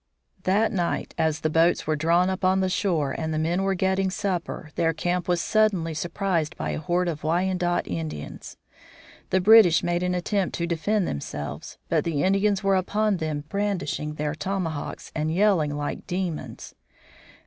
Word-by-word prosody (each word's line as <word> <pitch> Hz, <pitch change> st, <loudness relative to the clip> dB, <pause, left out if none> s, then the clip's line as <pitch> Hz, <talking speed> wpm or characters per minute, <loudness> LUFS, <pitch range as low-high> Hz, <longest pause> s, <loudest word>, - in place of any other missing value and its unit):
That 205 Hz, +4 st, +3 dB
night, 175 Hz, -5 st, -2 dB
as 160 Hz, -1 st, +1 dB
the 155 Hz, -, +1 dB
boats 165 Hz, +2 st, +3 dB
were 155 Hz, -, +1 dB
drawn 170 Hz, +4 st, +3 dB
up 190 Hz, 0 st, -3 dB
on 185 Hz, +1 st, +3 dB
the 190 Hz, -1 st, +1 dB
shore 170 Hz, -8 st, 0 dB
and 160 Hz, -1 st, -3 dB
the 155 Hz, -, -1 dB
men 165 Hz, +4 st, 0 dB
were 195 Hz, 0 st, +1 dB
getting 190 Hz, +1 st, +1 dB
supper, 185 Hz, -5 st, -3 dB
their 165 Hz, -1 st, +1 dB
camp 175 Hz, +2 st, -1 dB
was 175 Hz, -1 st, +1 dB
suddenly 200 Hz, -7 st, +2 dB
surprised 175 Hz, -1 st, -1 dB
by -, -, -2 dB
a -, -, -3 dB
horde 175 Hz, +3 st, 0 dB
of 155 Hz, -3 st, -4 dB
Wyandot 175 Hz, +2 st, 0 dB
Indians. 80 Hz, -4 st, -6 dB, 0.7 s
The 190 Hz, -, +3 dB
British 200 Hz, -5 st, +7 dB
made 175 Hz, 0 st, 0 dB
an 180 Hz, 0 st, 0 dB
attempt 190 Hz, +1 st, -1 dB
to 170 Hz, -, -1 dB
defend 175 Hz, +4 st, 0 dB
themselves. 75 Hz, 0 st, -5 dB
But -, -, +1 dB
the 155 Hz, -4 st, -1 dB
Indians 195 Hz, +1 st, +2 dB
were 195 Hz, 0 st, +3 dB
upon 205 Hz, +2 st, +1 dB
them 155 Hz, -3 st, -3 dB
brandishing 195 Hz, -6 st, -2 dB
their 150 Hz, -1 st, -2 dB
tomahawks 165 Hz, -3 st, -4 dB
and 155 Hz, 0 st, -1 dB
yelling 170 Hz, -6 st, +2 dB
like 145 Hz, 0 st, -4 dB
demons. 180 Hz, -3 st, -4 dB
175 Hz, 170 wpm, -25 LUFS, 160-190 Hz, 0.7 s, British